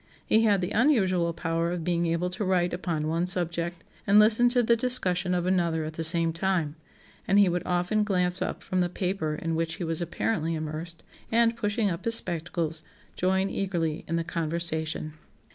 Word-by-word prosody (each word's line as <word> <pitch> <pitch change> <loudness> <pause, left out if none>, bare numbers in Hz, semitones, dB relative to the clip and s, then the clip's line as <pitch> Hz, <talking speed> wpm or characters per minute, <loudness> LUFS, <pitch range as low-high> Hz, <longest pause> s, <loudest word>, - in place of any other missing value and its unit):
He 225 +1 +3
had 200 -3 +3
the 180 - -3
unusual 190 - +2
power 165 0 -2
of 175 -1 -3
being 170 0 0
able 170 +2 -1
to 190 +3 -3
write 180 -2 +1
upon 170 -4 -2
one 165 +3 0
subject 170 -1 -1 0.2
and 200 +1 +5
listen 220 +3 +6
to 245 0 +2
the 235 +1 +4
discussion 190 -7 +2
of 175 -1 -1
another 170 -4 0
at 155 - -6
the 165 - -4
same 165 0 +2
time; 165 -4 -1 0.5
and 195 - +3
he 200 -1 +6
would 175 0 0
often 180 +4 +1
glance 180 -3 0
up - - -3
from 185 - -2
the 175 - 0
paper 180 -4 -2
in 165 +2 -3
which 165 0 -1
he - - -5
was 165 0 +1
apparently 170 -1 -1
immersed, 155 +2 -6 0.3
and 230 0 +3
pushing 210 -2 0
up 170 - -5
his 230 0 +3
spectacles 165 -3 -1 0.3
join 190 +1 +1
eagerly 170 -5 -2
in 165 - -2
the 165 - 0
conversation." 160 -2 -3
175 Hz, 190 wpm, -27 LUFS, 165-195 Hz, 0.5 s, listen